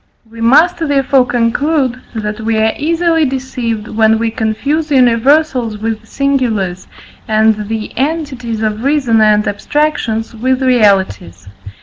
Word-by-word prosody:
We 230 +1 -12
must 300 +10 +4
therefore 275 -4 +1
conclude, 255 +2 0
that 210 0 -4
we 220 0 -1
are 220 0 +2
easily 330 +1 +1
deceived, 250 -5 -3
when 220 0 +2
we 225 0 -1
confuse 275 +9 -2
universals 250 -2 +2
with 220 +1 -4
singulars, 225 -11 -1 0.4
and 215 -1 +1
the 220 0 -5
entities 260 -6 -3
of 215 +1 -2
reason 265 -6 +2
and 210 -1 +3
abstractions 225 -2 -1
with 255 +3 -1
realities. 195 - +1
230 Hz, 120 wpm, -14 LUFS, 220-275 Hz, 0.4 s, must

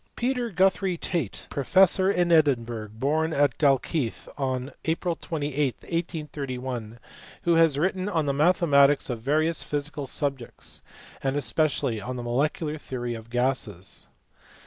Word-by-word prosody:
Peter 245 -1 -1
Guthrie 190 -1 +2
Tail, 165 - -1 0.2
professor 190 +6 +4
in 175 -3 +2
Edinburgh, 120 -9 +2
born 155 +7 0
at 140 -4 +2
Dalkeith 140 -2 +1
on 130 -1 -2
April 165 +1 0
28, 145 -5 -2
1831, 130 -8 -4 0.5
who 170 - +3
has 165 -4 +4
written 185 +4 0
on 165 -6 0
the 140 - +1
mathematics 145 -3 +4
of 120 - -3
various 155 +5 +1
physical 145 -1 -3
subjects, 135 -4 -3 0.4
and 135 0 0
especially 145 -5 +1
on 125 +5 -5
the 120 - -5
molecular 150 +5 -1
theory 120 -4 -4
of 115 0 -9
gases. 120 -7 -1
145 Hz, 125 wpm, -26 LUFS, 130-165 Hz, 0.5 s, professor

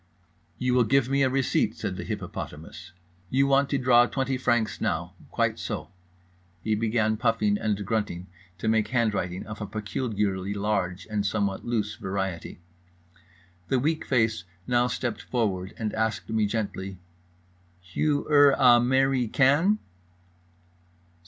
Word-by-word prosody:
"You 125 0 0
will 125 -1 +5
give 125 +3 +2
me 140 +1 +2
a 135 - +4
receipt," 135 0 +1
said - - -3
the - - -5
hippopotamus. 75 +3 -7 0.4
"You 135 +2 +3
want 140 0 +3
to 140 - +1
draw 120 -2 +5
20 135 0 -1
francs 120 -3 0
now, - - -1 0.2
quite - - 0
so." - - -5 0.7
He 110 - 0
began, 110 0 +1
puffing 110 -3 +1
and 105 -2 -1
grunting, 105 -5 -2 0.3
to 100 - -4
make 110 -1 +2
handwriting 105 -7 -1
of 105 +1 -8
a 105 - -3
peculiarly 105 -3 -2
large 100 -3 -1
and 105 -2 -1
somewhat 100 -1 -1
loose 110 -3 -2
variety. 95 -3 -4 1.1
The 135 - +1
weak 155 +5 0
face 110 -7 +1 0.2
now 125 0 +2
stepped 125 -2 -3
forward, 100 -6 -2
and 110 -2 -3
asked 110 0 -1
me 110 -2 +2
gently: 100 -3 -4 0.8
"Hugh 145 - -1
er 145 -2 +6
a 125 -2 +7
merry 130 0 +2
can?" 145 - +3
110 Hz, 140 wpm, -26 LUFS, 105-130 Hz, 1.1 s, a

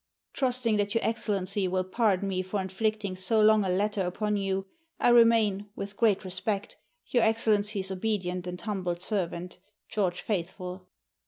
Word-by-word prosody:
Trusting 250 -4 +1
that 205 +1 -1
your 230 - +1
Excellency 200 -3 -1
will 185 0 0
pardon 200 0 +1
me 185 -1 -1
for 185 +2 -3
inflicting 200 +1 -2
so 190 +4 +2
long 215 0 +5
a 190 - -1
letter 205 +2 0
upon 210 +4 -1
you, 195 -1 -1 0.3
I - - +4
remain, 225 -4 +4
with 200 0 -6
great 205 -3 +2
respect, 195 +2 -2 0.3
Your 245 - +1
Excellency's 210 -3 +1
obedient 185 -3 -2
and 180 0 -5
humble 190 -4 -2
servant, 180 -1 -3 0.3
GEO. 205 -4 +1
FAITHFULL. 180 0 -4
200 Hz, 150 wpm, -28 LUFS, 185-215 Hz, 0.3 s, long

